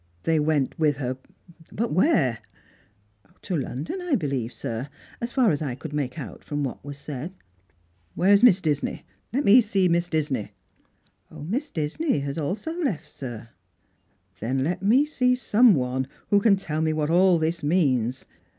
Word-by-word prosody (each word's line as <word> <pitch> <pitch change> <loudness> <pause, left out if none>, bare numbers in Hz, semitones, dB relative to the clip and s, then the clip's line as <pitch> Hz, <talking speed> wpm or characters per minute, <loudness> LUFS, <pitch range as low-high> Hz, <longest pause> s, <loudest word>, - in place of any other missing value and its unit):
" 85 - -37
They 160 -1 +2
went 150 -2 0
with 150 -3 +2
her, 130 -1 -3 0.5
but 230 -2 -2
where? 150 - +2 0.3
" 100 +1 -35
" 105 -2 -33
To 185 - -2
London, 150 - -4
I 355 -5 +1
believe, 135 - -2
sir. 115 +4 -5 0.3
As 235 +1 -3
far 250 -6 +3
as 145 - -1
I 135 -5 -3
could 145 +3 -8
make 135 -4 -2
out - - -8
from 145 -1 -3
'jiat 135 - -5
was 145 -1 -7
said." 145 +4 -6 0.4
" 85 0 -40
Where 190 +3 +3
is 200 - +5
Miss 200 -7 +6
Disney? 150 -4 -2 0.3
Let 275 +4 0
me 230 +5 +8
see 195 -4 +1
Misa 170 0 +1
Disney." 145 -9 -2 0.5
" - - -39
Miss 235 - -4
Disney 165 - -1
have 140 +1 -4
left - - -1
also, 235 - -2
sir." 120 -4 -8 0.4
" 95 -1 -41
Then 130 +4 -1
let 175 +5 -2
me 240 +9 +4
see 250 -4 +1
some 235 -2 +4
one 130 0 -1 0.2
who 205 - +6
can 205 -2 +5
tell 155 -5 -3
me 160 0 +1
what 155 0 -1
all 180 +1 +5
thia 160 +1 -1
means. 130 -7 +1
155 Hz, 185 wpm, -25 LUFS, 130-200 Hz, 0.5 s, me